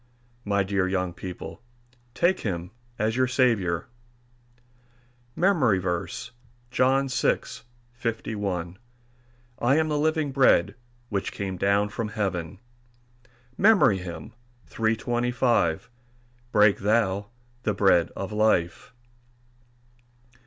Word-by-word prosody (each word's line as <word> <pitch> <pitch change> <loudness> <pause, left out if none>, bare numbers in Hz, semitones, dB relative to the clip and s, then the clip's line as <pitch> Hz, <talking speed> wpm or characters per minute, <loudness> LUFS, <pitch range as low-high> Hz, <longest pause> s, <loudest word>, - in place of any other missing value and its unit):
My 100 -2 +1
dear 95 -1 0
young 95 -2 -1
people, 90 +4 -8 0.5
take 185 +5 +2
him 90 -3 -4 0.3
as 110 +1 0
your 130 0 +2
Saviour. 110 -10 +1 1.5
MEMORY 160 - +3
VERSE, 90 -1 -3 0.4
John 135 +2 +2
6: 125 -2 -1 0.3
51 105 -6 -4 0.8
"I 125 +4 +3
am 160 0 +2
the 150 -1 0
living 155 -1 0
bread 130 -10 +4 0.4
which 100 -3 -2
came 95 -2 -4
down 100 +3 +1
from 110 +2 -3
heaven." 100 -4 -3 1.0
MEMORY 190 - +5
HYMN 90 +4 -8 0.4
_"Break 120 0 0
thou 100 -1 +1 0.3
the 110 -3 0
bread 95 -4 +3
of 100 +1 -5
life." 105 0 0
110 Hz, 95 wpm, -25 LUFS, 95-125 Hz, 1.5 s, MEMORY